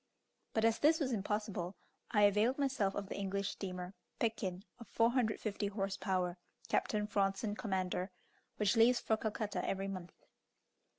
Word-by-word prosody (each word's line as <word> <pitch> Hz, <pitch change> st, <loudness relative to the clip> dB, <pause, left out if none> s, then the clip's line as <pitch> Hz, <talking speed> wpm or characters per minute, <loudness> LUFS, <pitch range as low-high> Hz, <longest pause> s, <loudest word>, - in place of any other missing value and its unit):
But 220 Hz, 0 st, +3 dB
as 225 Hz, 0 st, +3 dB
this 315 Hz, +2 st, +5 dB
was 270 Hz, -4 st, 0 dB
impossible, 205 Hz, -4 st, -2 dB, 0.3 s
I 210 Hz, -3 st, +4 dB
availed 210 Hz, +6 st, +4 dB
myself 265 Hz, -9 st, +1 dB
of 200 Hz, -1 st, -3 dB
the -, -, -5 dB
English 200 Hz, 0 st, -1 dB
steamer, 180 Hz, -1 st, -5 dB, 0.2 s
"Pekin," 200 Hz, -5 st, -1 dB, 0.2 s
of 235 Hz, -, -10 dB
450 225 Hz, -3 st, +1 dB
horse 195 Hz, -1 st, -2 dB
power, 185 Hz, -2 st, -1 dB, 0.3 s
Captain 210 Hz, -1 st, +1 dB
Fronson 205 Hz, +1 st, 0 dB
commander, 185 Hz, -3 st, -1 dB, 0.5 s
which 210 Hz, +2 st, +3 dB
leaves 235 Hz, +2 st, +6 dB
for 220 Hz, -, +1 dB
Calcutta 215 Hz, -1 st, -2 dB
every 195 Hz, 0 st, -1 dB
month. 185 Hz, -3 st, -6 dB
205 Hz, 140 wpm, -35 LUFS, 195-225 Hz, 0.5 s, leaves